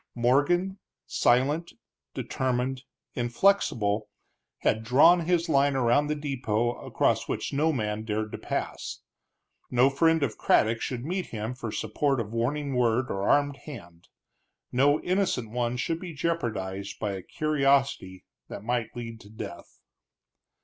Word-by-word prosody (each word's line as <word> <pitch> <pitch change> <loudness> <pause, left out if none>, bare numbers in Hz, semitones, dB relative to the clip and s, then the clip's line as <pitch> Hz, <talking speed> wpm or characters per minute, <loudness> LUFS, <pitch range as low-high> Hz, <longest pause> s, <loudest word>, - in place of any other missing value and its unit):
Morgan, 145 +11 +2 0.3
silent, 145 +8 +2 0.4
determined, 130 +1 -2 0.3
inflexible, 120 - +1 0.5
had 110 - +1
drawn 160 +8 +5
his 175 -1 +2
line 140 -2 +3
around 130 +3 +3
the 150 - 0
depot, 120 -6 -1
across - - +1
which - - -3
no 155 +3 +2
man 105 -5 -2
dared 110 -1 -2
to - - -5
pass. - - -4 0.7
No 125 +2 +4
friend 160 +2 +3
of 115 -6 -2
Craddock 115 +1 +3
should 125 -1 -3
meet 185 +3 -2
him 110 +2 -4
for 120 -3 -6
support 140 +2 0
of 110 -1 -4
warning 140 +5 -1
word 125 0 +1
or 100 0 -1
armed 145 -1 +3
hand; 85 - -11 0.6
no 145 +4 +3
innocent 180 - 0
one 120 0 -1
should 165 +6 -1
be 180 -2 -7
jeopardized 100 - -2
by 105 -2 -1
a 95 -1 -5
curiosity 135 -7 0 0.2
that - - -8
might 120 0 -2
lead 115 -2 -6
to 100 - -15
death. 105 -4 -9
125 Hz, 135 wpm, -27 LUFS, 110-145 Hz, 0.7 s, drawn